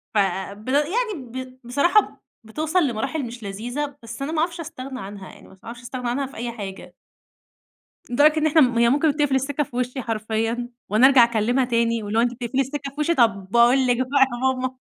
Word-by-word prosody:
فب 200 +2 -1
يعني 360 - +1
ب 255 -1 -8
بصراحة 315 - +2 0.2
بتوصَّل 310 +8 0
لمراحل 270 +5 -2
مش 235 -1 -9
لذيذة، 245 +8 -4
بس 230 +3 -9
أنا 285 +3 -2
ما 320 - -1
أعرفش 340 +1 -1
أستغنى 270 -5 -7
عنها 195 -2 -8
يعني، - - -16
ما 190 - -18
أعرفش 240 +2 -8
أستغنى 245 0 -5
عنها 275 +3 -1
في 270 - -11
أي 235 +1 -3
حاجة. 195 -4 -8 1.2
لدرجة 295 +5 +4
إن 310 - +1
إحنا 315 +1 +4
م 245 -4 +3
هي 235 - +5
ممكن 290 +5 +3
بتقفِل 290 -2 0
السكّة 275 +2 0
في 245 - -11
وشِّي 250 +1 -2
حرفيًا، 225 +2 -2 0.2
وأنا 220 +5 +5
أرجَع 265 -3 +7
أكلِّمها 235 +3 +1
تاني، 230 -2 0
واللي 210 +2 -2
هو: - - +5
"أنتِ 245 0 0
بتقفِلي 245 +2 -2
السكّة 275 +1 -3
في 290 - -9
وشِّي؟ 335 +3 +2
طب 210 - +2
باقول 240 +3 +4
لِك 245 -1 +3
بقى 260 +3 0
يا 240 - -4 0.2
ماما." 255 0 -3
250 Hz, 200 wpm, -23 LUFS, 230-280 Hz, 1.2 s, أرجَع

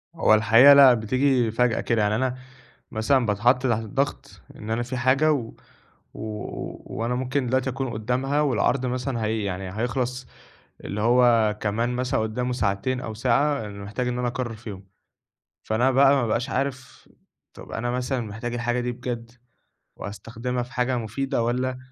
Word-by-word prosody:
هو 165 - +4
الحقيقة 115 +6 +7
لأ، 135 -3 +8
بتيجي 125 +1 +1
فجأة 120 0 +1
كده، 115 -2 0
يعني 105 0 +1
أنا 130 +2 -1 0.6
مثلًا 120 +3 +2
باتحط 115 +4 +3
تحت 115 -2 +1
الضغط 135 +7 -3
إن 105 - -9
أنا 115 +2 0
في 120 +2 -5
حاجة، 135 +5 +3
و 120 -6 -2 0.6
و 105 -1 -6 0.2
وأنا 120 +2 -1
ممكن 130 +1 -1
دلوقتي 130 +1 0
أكون 130 0 -3
قدامها 125 +6 -1
والعرْض 140 -2 +1
مثلًا 125 -2 -2
هي 110 -1 -1
يعني 95 0 -4
هيخلص 125 +1 -2 0.6
اللي 100 - -4
هو 115 -2 +4
كمان 110 +3 -1
مثلًا 125 -2 0
قدامه 125 +3 -2
ساعتين 125 +2 -1
أو 110 -4 -6
ساعة، 130 +4 +1
يعني 100 -1 -8
محتاج 105 +5 -3
إن 125 0 -2
أنا 125 - 0
أقرر 120 -1 -4
فيهم، 105 -3 -9 0.8
فأنا 120 +4 +2
بقى 135 +1 +5
ما 135 - +1
بابقاش 120 +3 -1
عارف 130 -1 -4 0.5
طب - - -12
أنا 120 +2 -2
مثلًا 125 +1 -2
محتاجة 115 +2 -5
الحاجة 120 0 -1
دي 120 0 -2
بجد، 120 -1 -6 0.7
وهاستخدمها 115 +5 -5
في 125 +1 -13
حاجة 125 0 0
مفيدة 115 +2 -2
والَّا 125 +2 -1
120 Hz, 160 wpm, -24 LUFS, 110-130 Hz, 0.8 s, لأ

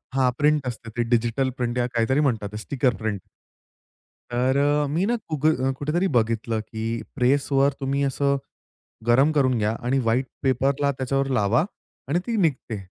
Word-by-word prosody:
हां 130 -2 +3
प्रिंट 150 -2 +2
असते 115 -1 -6
ते 120 - +2
डिजिटल 120 +3 +1
प्रिंट 120 -1 -2
या 120 - +2
काहीतरी 120 +4 +2
म्हणतात 105 -4 -2
स्टिकर 130 -3 +1
प्रिंट. 105 0 -3 1.1
तर 130 +2 +2
अ, 145 +1 +2
मी 165 +7 0
ना, 240 - +1
कुब 155 -3 -3 0.4
कुठेतरी 165 +6 0
बघितलं, 115 0 0
की 110 +1 -4
प्रेसवर 140 +1 +2
तुम्ही 140 +1 -1
असं 140 0 +1 0.7
गरम 135 +6 +4
करून 130 -4 +2
घ्या 105 0 +1
आणि 135 +2 +2
व्हाईट 125 +2 +1 0.2
पेपरला 135 +2 +1
त्याच्यावर 135 +1 -1
लावा 105 +8 +2 0.4
आणि 160 +5 +2
ती 230 -2 -1
निघते. 145 - 0
130 Hz, 155 wpm, -24 LUFS, 120-140 Hz, 1.1 s, गरम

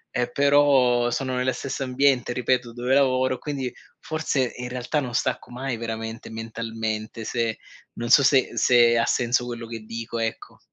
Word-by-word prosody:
eh 120 0 0
però 140 -4 +4
sono 130 +1 -2
nello 125 +1 +1
stesso 135 0 -4
ambiente, 130 -1 +2
ripeto, 125 0 0
dove 125 +2 -1
lavoro, 130 -1 +3
quindi, 135 -3 -4 0.3
forse 150 -5 -1
in 125 0 -5
realtà, 125 +4 -2
non 125 -3 -5
stacco 120 - -1
mai 130 +1 -3
veramente 115 0 -5
mentalmente 110 -1 -5
se 115 -1 -1 0.4
non 120 0 -4
so 140 - +7
se 135 -1 +4
se 120 -1 +5
ha 115 - +3
senso 120 0 +1
quello 120 -1 -6
che 115 0 -6
dico, 115 +2 -6
ecco. 115 0 -4
125 Hz, 160 wpm, -24 LUFS, 115-130 Hz, 0.4 s, so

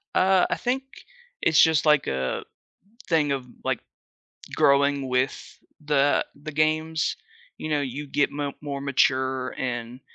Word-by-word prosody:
Uh, 190 0 +4
I - - +1
think 255 +2 -1 0.6
it's 160 -1 +5
just, 160 -1 +4
like, 150 -2 +4
a 65 -1 -2 0.7
thing 155 -4 +2
of, 135 -2 -3 0.2
like, - - -1 0.8
growing 140 0 +3
with 125 +2 -2 0.2
the 145 -1 +2
the 145 +2 -8
games. 155 +1 0 0.4
You 155 - -5
know, 150 -1 +1
you 140 +2 -5
get 140 +1 +1
mo 145 -1 -3
more 140 -2 -5
mature 130 -1 +1
and 120 -1 -4
140 Hz, 135 wpm, -25 LUFS, 130-155 Hz, 0.8 s, it's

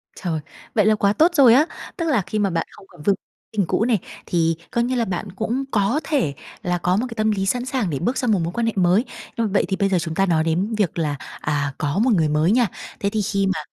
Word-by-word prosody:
Trời, 165 -4 -2 0.4
vậy 210 -2 +4
là 215 0 +5
quá 200 -1 +2
tốt 325 +9 +4
rồi 260 -6 +7
á! 280 +5 +6 0.3
Tức 335 - -1
là 245 -9 +3
khi 190 +4 -3
mà 200 -2 +2
bạn 165 -2 -1
không - - -15
còn 175 - -15
vương 200 +4 +3 0.4
tình 205 -4 +1
cũ 220 - +1
này, 230 -6 +2 0.3
thì 165 -1 +1 0.2
coi 235 - +1
như 255 +1 -1
là 235 - +1
bạn 190 +1 -4
cũng 225 +7 -2
có 210 +8 +2
thể 255 - 0 0.3
là 180 0 0
có 180 +1 +1
một 225 - 0
cái 230 - -7
tâm 215 -1 +1
lý 195 -2 -1
sẵn 245 +5 0
sàng 255 -7 -1
để 140 -4 -2
bước 245 +9 -1
sang 250 -4 +1
một 200 - +3
mối 170 +1 -3
quan 235 +2 0
hệ 225 - 0
mới, 185 +5 +3 0.3
ơ, 230 -2 0
vậy 195 - +2
thì 190 - 0
bây 195 0 +1
giờ 185 - +2
chúng 160 -1 -4
ta 195 - +3
nói 165 -4 +2
đến 180 +7 0
việc 195 -5 0
là, 150 -3 0 0.3
à, 145 -2 -1
có 155 +5 -1
một 240 +1 +3
người 160 -6 +2
mới 155 +4 +2
nha. 240 0 +4 0.3
Thế 200 - 0
thì 215 0 -1
khi 195 -1 0
mà 185 -5 0
200 Hz, 275 wpm, -22 LUFS, 175-230 Hz, 0.4 s, rồi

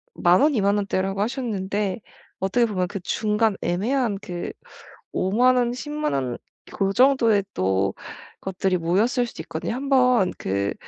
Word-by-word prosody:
10,000 175 +5 +4
원, 295 -2 +4
20,000 200 -1 +2
원대라고 195 0 -1
하셨는데 210 -5 -2 0.4
어떻게 195 +6 +2
보면 185 -5 -1
그 200 - -5
중간 210 +2 +1
애매한 215 +4 0
그 175 -3 -5 0.6
50,000 240 +7 +3
원, 240 -1 +1
100,000 295 - -3
원 125 -3 -1 0.4
그 195 -1 0
정도의 235 -5 +4
또 95 +1 +1 0.5
것들이 190 -1 -1
모였을 215 +9 +1
수도 - - -8
있거든요. - - -4
한번 255 -7 +3
그 100 +1 -1
205 Hz, 235 characters per minute, -23 LUFS, 185-245 Hz, 0.6 s, 10,000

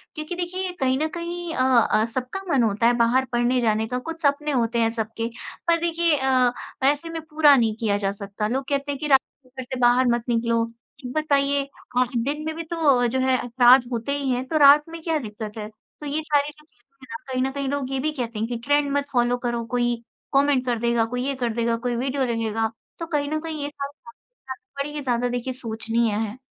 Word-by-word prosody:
क्योंकि 310 +3 -5
देखिए 365 +1 -3
कहीं 260 -1 +2
न 315 - +1
कहीं 345 0 -4
अ 255 - +2 0.3
अ, 215 - +3
सबका 260 +9 -3
मन 255 - +4
होता 220 +1 +2
है 240 - +4
बाहर 240 +3 +3
पढ़ने 240 +1 +2
जाने 220 -1 +1
का, 250 - -2
कुछ 330 +5 -7
सपने 295 +1 +1
होते 235 -3 +1
हैं 225 -1 +3
सबके, 225 +1 -3 0.4
पर 335 0 +4
देखिए 335 -2 +2
अ, 260 -2 +3 0.3
ऐसे 290 +4 +2
में 325 -1 -5
पूरा 300 -2 +6
नहीं 225 -4 +2
किया 210 -3 +1
जा 195 -1 -1
सकता। 200 +1 -4
लोग 265 +4 -2
कहते 280 0 -1
हैं 280 - -5
कि 300 - -3
रात 270 -2 +6 0.2
को 255 - -24
घर 260 0 -7
से 255 0 -6
बाहर 245 +1 +4
मत 235 -1 +1
निकलो। 230 -1 +1 0.4
ये 250 - -5
बताइए 280 -2 +1 0.3
अ, 250 - +5
दिन 290 +6 -2
में 315 - -2
भी 335 - -4
तो 305 -7 +2
जो 260 +3 -1
है 260 0 +3
अपराध 245 +1 +5
होते 235 +3 -2
ही 275 -2 -2
हैं, 250 +1 -1
तो 315 - 0
रात 290 0 +8
में 330 0 -8
क्या 325 -2 0
दिक्‍क़त 215 -3 -7
है? 210 -1 -5 0.3
तो 300 - -8
ये 295 +2 -1
सारी 295 -1 +1
जो 300 0 -22
चीज़ें 250 -1 -38
हैं - - -26
ना, 230 - -4
कहीं 255 - 0
न 265 - -1
कहीं 275 0 -3
लोग 280 -2 -2
ये 270 - -1
भी 305 +3 0
कहते 235 -6 -4
हैं 225 - -1
कि 240 0 -3
ट्रेंड 290 0 +2
मत 285 - -1
फ़ॉलो 245 -1 +2
करो। 235 -1 -1
कोई 240 -1 +2 0.4
कॉमेंट 275 -2 +3
कर 240 -2 0
देगा 235 -1 +2
कोई 250 - -2
ये 275 - -1
कर 235 - 0
देगा 235 0 0
कोई 240 - 0
वीडियो 265 +2 -1
ले 235 -2 -1
लेगा, 225 0 -1 0.3
तो 335 - -3
कहीं 295 -3 -1
न 310 +1 -1
कहीं 315 -2 -5
ये 285 - -3
सब 280 -1 -5
बाते 470 - -17 0.7
बड़ी 295 +1 -7
ही 300 - -3
ज़्यादा 245 -1 0
देखिए 245 +1 -3
सोचनीय 230 -2 -1
है। 220 +2 -3
260 Hz, 235 wpm, -24 LUFS, 235-290 Hz, 0.7 s, रात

